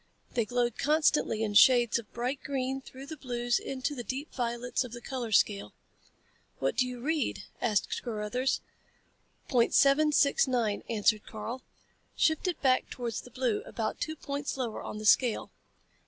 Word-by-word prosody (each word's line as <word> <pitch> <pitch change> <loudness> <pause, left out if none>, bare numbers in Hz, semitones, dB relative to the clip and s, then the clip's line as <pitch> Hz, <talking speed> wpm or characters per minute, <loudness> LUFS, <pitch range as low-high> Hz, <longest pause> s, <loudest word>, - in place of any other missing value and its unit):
They 235 -2 +1
glowed 240 0 -1
constantly 300 -7 +2
in 210 -2 -1
shades 240 +1 +6
of 220 - -12
bright 250 +3 -2
green 270 -1 -2
through 265 +1 -11
the 315 +2 -7
blues 240 -2 -1
into 270 +2 -3
the 245 -4 -5
deep 270 +6 -5
violets 245 0 -1
of 245 -2 -9
the 240 - -6
color 245 -2 -5
scale. 200 -1 +2 0.8
"What - - -1
do 255 - +2
you 250 -1 -6
read?" 310 +3 -1 0.2
asked 215 -4 0
Carruthers. 235 +3 -1 0.9
"Point 240 -3 +2
seven 290 +2 +5
six 285 -1 +4
nine," 235 -5 0
answered 215 -1 +2
Karl. 230 +4 -6 0.5
"Shift 315 +3 +2
it 350 -4 -1
back 255 -1 +3
towards 235 -3 -4
the - - -14
blue, 250 -3 -1
about 220 -2 -3
two 315 - -2
points 285 -1 -4
lower 240 -4 -3
on - - -6
the 215 - -6
scale." 235 +1 +3
250 Hz, 165 wpm, -30 LUFS, 230-270 Hz, 0.9 s, shades